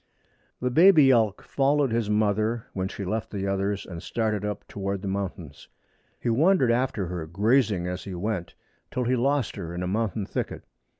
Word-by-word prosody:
The 125 0 0
baby 160 -2 +7
elk 110 -5 +2
followed 140 -1 +1
his 115 -2 0
mother, 110 +2 +1
when 95 -1 -2
she 100 0 -6
left 110 +4 -2
the 100 -2 -4
others, 100 +1 -1
and 85 -3 -8
started 110 0 -1
up 105 -1 -4
toward 100 -1 -4
the - - -3
mountains. 95 -6 -5 0.5
He - - -5
wandered 135 +2 +4
after 120 -5 0
her, 85 -2 -5
grazing 105 +1 +2
as 90 0 -4
he 95 -2 -6
went, 95 -1 -3 0.3
till 125 - -2
he 125 +2 +1
lost 135 -1 0
her 85 -3 -5
in 90 - -3
a - - -2
mountain 105 +1 -1
thicket. - - -4
105 Hz, 180 wpm, -26 LUFS, 95-120 Hz, 0.5 s, baby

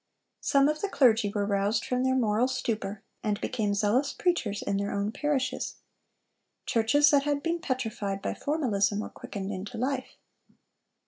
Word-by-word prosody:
Some 275 0 +3
of 305 0 -1
the 405 - -1
clergy 225 - +4
were 205 -1 -1
roused 200 +2 +1
from 250 0 0
their 260 0 +2
moral 230 -1 +2
stupor, 215 -6 -3 0.2
and 210 -2 0
became 215 -5 -1
zealous 220 +8 +2
preachers 235 - 0
in 200 - 0
their 200 0 -1
own 200 +1 -1
parishes. 280 0 -1 0.9
Churches 245 +6 +4
that 285 -1 +5
had 285 0 -1
been 340 +1 0
petrified 220 -8 -2
by - - -2
formalism 215 -9 0
were - - -6
quickened 195 0 -6
into 200 +4 -6
life. 260 +2 -2
230 Hz, 155 wpm, -28 LUFS, 205-275 Hz, 0.9 s, that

